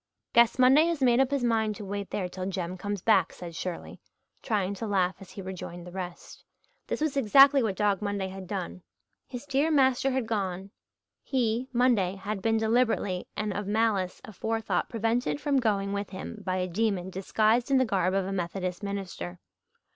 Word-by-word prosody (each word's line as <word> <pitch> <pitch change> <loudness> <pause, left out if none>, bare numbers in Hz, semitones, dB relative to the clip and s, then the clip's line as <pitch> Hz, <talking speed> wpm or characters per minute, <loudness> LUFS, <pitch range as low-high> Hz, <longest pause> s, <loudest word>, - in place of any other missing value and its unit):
"Guess 235 +1 +5
Monday 260 +5 +6
has 330 -5 -1
made 245 -1 +4
up 265 -1 +3
his 280 -3 -1
mind 220 -3 +1
to 205 - -8
wait 200 0 -4
there 185 -3 -2
till 185 +1 -5
Jem 185 -2 -3
comes 205 0 -4
back," 195 -6 +4
said 175 -2 -9
Shirley, 180 0 -6 0.4
trying 200 -5 -1
to 220 +3 -5
laugh 190 -3 +1
as 195 - -12
he 195 - -8
rejoined 175 -2 -7
the 180 - -9
rest. 180 -1 -8 0.4
This - - -3
was 310 -3 0
exactly 275 +2 +6
what 215 -5 0
Dog 205 -1 +1
Monday 200 -2 -2
had 190 -1 -8
done. 85 - -5 0.5
His 245 +1 -7
dear 285 +2 +1
master 265 -3 +3
had 260 -2 -1
gone 195 -3 -3 0.5
he, 245 -1 0
Monday, 235 -7 +2
had 195 +1 -4
been 225 +1 +2
deliberately 220 -5 +1
and 210 -1 -1
of 205 0 -4
malice 205 -4 0
aforethought 225 +2 -2
prevented 230 +4 0
from 290 -2 +1
going 200 -4 0
with 200 0 -3
him 195 +3 -7
by 185 -1 -1
a 185 0 -1
demon 190 -1 -1
disguised 215 +6 +1
in 275 - +4
the 260 - +4
garb 190 -3 +1
of 195 -1 +1
a 195 - -3
Methodist 180 0 -3
minister. 190 - -5
205 Hz, 185 wpm, -28 LUFS, 185-235 Hz, 0.5 s, Monday